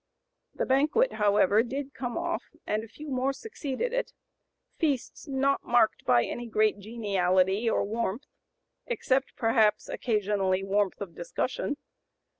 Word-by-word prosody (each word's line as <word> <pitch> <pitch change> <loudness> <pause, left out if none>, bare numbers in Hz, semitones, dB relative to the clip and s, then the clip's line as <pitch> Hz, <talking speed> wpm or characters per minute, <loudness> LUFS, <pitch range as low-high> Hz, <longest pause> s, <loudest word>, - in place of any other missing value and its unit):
The - - -1
banquet, 305 - +3
however, 205 0 +4
did 270 +3 -4
come 245 -2 -4
off, 340 0 -1 0.2
and 215 +1 -1
a - - -9
few 295 +6 -9
more 260 +1 +1
succeeded 425 - -4
it; - - -1 0.7
feasts 285 -6 -1
not 275 0 +1
marked 240 -3 +2
by 120 -1 +4
any 240 0 -5
great 215 -2 +2
geniality 195 -1 +1
or - - +1
warmth, 225 +4 -2 0.6
except 270 - 0
perhaps 220 -2 +2
occasionally 200 -4 0
warmth 200 0 0
of 190 -4 -5
discussion. 250 - -3
230 Hz, 130 wpm, -28 LUFS, 205-275 Hz, 0.7 s, however